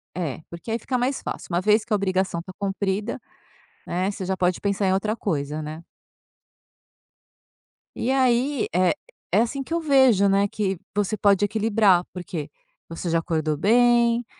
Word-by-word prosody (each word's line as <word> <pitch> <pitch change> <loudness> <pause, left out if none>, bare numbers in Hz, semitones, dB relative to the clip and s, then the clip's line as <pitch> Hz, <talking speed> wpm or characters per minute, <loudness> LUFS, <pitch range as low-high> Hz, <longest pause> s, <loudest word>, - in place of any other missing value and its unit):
É, 165 -5 -3
porque 170 +6 -9
aí 225 - 0
fica 255 +3 -4
mais 255 +3 -1
fácil, - - -5
uma 170 - +2
vez 210 +2 +3
que 235 - -23
a - - +4
obrigação 190 -3 0
está 185 +2 -9
cumprida, 200 +2 -2 0.7
né, 185 +3 -1
você 195 -2 -6
já 190 +1 -1
pode 180 -1 0
pensar 200 0 0
em 185 - +2
outra 210 +3 0
coisa, 155 -8 -3
né. 155 +2 -7 2.1
E 245 - -2
aí, 260 0 +2
eh, 180 - +3 0.4
é - - +4
assim 255 +4 -2
que 270 - -18
eu 335 - +1
vejo, 265 - +4
né, 200 +1 +3
que 195 -3 -2 0.2
você 205 +1 0
pode 200 -1 +3
equilibrar, 210 -3 +3
porque 170 -4 -6 0.4
você 165 +2 -6
já 165 0 +2
acordou 155 -2 -1
bem, 235 +5 +3
200 Hz, 165 wpm, -24 LUFS, 180-230 Hz, 2.1 s, a